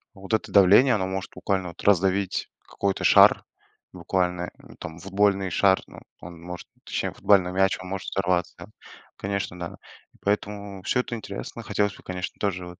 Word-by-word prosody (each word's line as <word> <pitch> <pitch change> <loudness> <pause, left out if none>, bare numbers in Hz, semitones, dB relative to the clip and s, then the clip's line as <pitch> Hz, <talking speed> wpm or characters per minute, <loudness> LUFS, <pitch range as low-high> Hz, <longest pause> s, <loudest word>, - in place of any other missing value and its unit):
вот 100 +2 -7
это 110 - 0
давление, 105 +6 +6
оно 95 -2 0
может 95 0 -4
буквально 90 0 -2
вот 85 - -12
раздавить 95 0 +2 0.2
какой-то 100 -1 -2
шар, - - +6 0.5
буквально, 90 -1 -1
ну, - - -16
там, 80 0 -7
футбольный 100 +1 +1
шар, 95 +2 +4
ну - - -12 0.2
он 85 -1 -11
может, 90 +1 -8 0.2
точнее - - -2
футбольный 95 -3 +3
мяч, 95 +1 +2
он 90 - -9
может 95 0 -4
взорваться. 90 -2 -2 0.5
Конечно, 100 -2 -3
да. 85 - -6 0.4
И - - -24
поэтому 100 -1 -2
всё 125 - +1
это 120 - -6
интересно. 110 +1 -7
Хотелось 105 -2 0
бы, - - -16
конечно, 90 0 -5
тоже 95 -3 -2
вот, 90 +1 -12
95 Hz, 170 wpm, -25 LUFS, 90-100 Hz, 0.5 s, давление